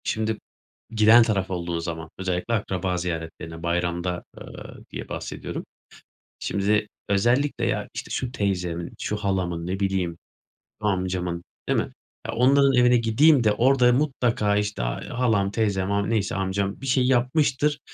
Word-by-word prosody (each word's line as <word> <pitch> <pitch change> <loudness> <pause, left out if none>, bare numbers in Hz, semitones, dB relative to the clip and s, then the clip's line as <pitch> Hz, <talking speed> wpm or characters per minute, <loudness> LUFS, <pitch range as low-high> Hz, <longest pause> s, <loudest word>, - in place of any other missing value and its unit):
Şimdi, 110 0 -1 0.5
giden 110 +1 +6
taraf 100 -4 0
olduğu 85 -2 -2
zaman, 85 -1 -5
özellikle 95 +4 -2
akraba 95 -4 -1
ziyaretlerine, 80 -1 -5
bayramda, 85 +1 -1 0.2
eee, - - -6 0.5
diye - - -7
bahsediyorum. - - -5 0.7
Şimdi, 105 +2 +1 0.2
özellikle 120 +8 +2
ya, - - -1
işte - - -6
şu 125 -2 -2
teyzemin, 90 -6 -2
şu 105 - -2
halamın, 90 -4 -1
ne 95 +1 -2
bileyim, 95 -4 -1 0.6
amcamın, 90 -4 -1 0.3
değil - - +2
mi? - - -2 0.3
Ya, - - -4
onların 135 +3 +5
evine 125 0 +5
gideyim 120 +4 +4
de, 105 - +4
orada 125 +2 +4
mutlaka 120 -6 +1
işte, 105 -7 -1
ay, - - -3
halam, 110 -5 +1
teyzem, 100 -3 0
am 100 +1 0
neyse 105 -3 0
amcam, 95 0 -2
bir 135 - -6
şey 130 -1 +3
yapmıştır. 135 +3 +2
100 Hz, 140 wpm, -25 LUFS, 90-120 Hz, 0.7 s, giden